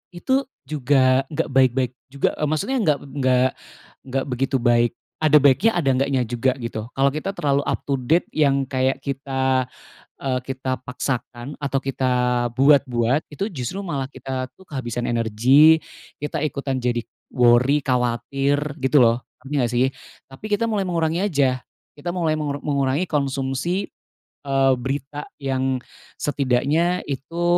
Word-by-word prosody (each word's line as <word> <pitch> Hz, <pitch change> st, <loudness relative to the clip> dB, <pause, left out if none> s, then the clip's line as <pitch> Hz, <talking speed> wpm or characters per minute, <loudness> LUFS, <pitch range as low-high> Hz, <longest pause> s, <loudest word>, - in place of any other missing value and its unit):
itu 260 Hz, +10 st, +1 dB, 0.2 s
juga 130 Hz, -2 st, +3 dB
nggak 155 Hz, -, -2 dB
baik-baik 130 Hz, -1 st, +3 dB, 0.2 s
juga 140 Hz, +1 st, 0 dB
e -, -, -5 dB
maksudnya 200 Hz, -, 0 dB
nggak 150 Hz, -8 st, +3 dB
nggak 130 Hz, -2 st, +2 dB, 0.6 s
nggak 135 Hz, 0 st, -2 dB
begitu 135 Hz, +1 st, 0 dB
baik. 120 Hz, -1 st, +3 dB, 0.3 s
Ada 155 Hz, -1 st, +5 dB
baiknya 150 Hz, -, +4 dB
ada 150 Hz, -6 st, +2 dB
nggaknya 135 Hz, 0 st, +1 dB
juga 120 Hz, +2 st, 0 dB
gitu. 115 Hz, -3 st, -5 dB
Kalau 135 Hz, +1 st, +3 dB
kita 195 Hz, +7 st, -4 dB
terlalu 140 Hz, -1 st, +1 dB
up -, -, -2 dB
to 140 Hz, -2 st, -1 dB
date 160 Hz, +8 st, +2 dB
yang 140 Hz, -3 st, +2 dB
kayak 130 Hz, 0 st, -1 dB
kita, 135 Hz, -2 st, 0 dB, 0.5 s
eee, 130 Hz, -2 st, -1 dB
kita 130 Hz, 0 st, -3 dB
paksakan 125 Hz, +1 st, -4 dB
atau 140 Hz, -2 st, -1 dB
kita 130 Hz, -1 st, -1 dB, 0.4 s
buat-buat, 130 Hz, 0 st, +3 dB
itu 195 Hz, +7 st, -3 dB
justru 160 Hz, -, -5 dB
malah 140 Hz, -8 st, -4 dB
kita 130 Hz, -2 st, -5 dB
tuh 190 Hz, -, -17 dB
kehabisan 120 Hz, -4 st, -4 dB
energi, 120 Hz, +8 st, +5 dB, 0.4 s
kita 150 Hz, +1 st, -3 dB
ikutan 135 Hz, -3 st, -2 dB
jadi 120 Hz, -1 st, +1 dB, 0.3 s
worry, 125 Hz, +3 st, +4 dB
khawatir 135 Hz, +3 st, 0 dB
gitu 140 Hz, 0 st, +3 dB
loh, 120 Hz, 0 st, +4 dB, 0.2 s
ngerti 135 Hz, +3 st, -9 dB
nggak 125 Hz, -4 st, +1 dB
sih? 125 Hz, +2 st, +3 dB, 0.4 s
Tapi 135 Hz, +9 st, -12 dB
kita 210 Hz, +3 st, +1 dB
mulai 210 Hz, -3 st, 0 dB
mengurangi 170 Hz, -1 st, 0 dB
aja, 135 Hz, -9 st, +1 dB, 0.3 s
kita 170 Hz, +4 st, -4 dB
mulai 165 Hz, -3 st, 0 dB
mengur 145 Hz, -2 st, -3 dB
mengurangi 140 Hz, +4 st, 0 dB
konsumsi, 140 Hz, +5 st, -1 dB, 0.6 s
eee, 135 Hz, -1 st, +3 dB
berita 140 Hz, +3 st, -4 dB
yang 130 Hz, -1 st, -1 dB, 0.4 s
setidaknya 145 Hz, +6 st, +1 dB
itu 145 Hz, +5 st, -4 dB
135 Hz, 140 wpm, -22 LUFS, 130-150 Hz, 0.6 s, Ada